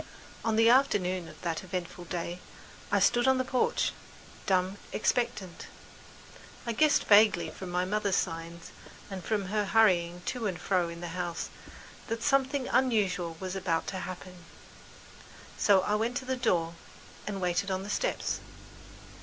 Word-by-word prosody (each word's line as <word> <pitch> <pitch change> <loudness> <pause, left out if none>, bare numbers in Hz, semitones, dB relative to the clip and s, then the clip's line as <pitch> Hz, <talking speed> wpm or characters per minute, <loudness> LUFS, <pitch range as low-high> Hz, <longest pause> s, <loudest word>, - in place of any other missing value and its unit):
On 225 -1 +1
the 225 +1 +5
afternoon 190 -9 +3
of - - -13
that 165 -1 -2
eventful 180 -1 -5
day, 175 0 -4 0.5
I - - +4
stood 240 +1 +3
on 265 0 +5
the 255 - 0
porch, 255 -1 +1 0.6
dumb, 185 +1 +1
expectant. 210 -6 -1 1.0
I 235 - -1
guessed 300 +6 +3
vaguely 205 -6 +5
from 185 +3 -8
my 180 +1 0
mother's 205 0 0
signs 165 -1 -3 0.4
and 190 -2 -5
from 200 -2 -1
the 210 -1 +1
hurrying 180 -5 +3
to 240 -4 -2
and 185 -3 -3
fro 180 -3 +1
in 170 0 -8
the 175 - -5
house 175 -1 -4 0.6
that 230 0 -3
something 275 -1 +2
unusual 195 -10 +1
was 185 0 -4
about 180 -4 0
to 190 - -3
happen, 180 0 -8 1.1
so 200 -2 +4
I 205 - -1
went 225 +3 0
to 260 - -5
the 260 0 -1
door 175 -10 +1 0.5
and 200 -2 -3
waited 180 +2 0
on 190 0 -1
the 200 - -7
steps. - - -1
190 Hz, 155 wpm, -29 LUFS, 175-225 Hz, 1.1 s, the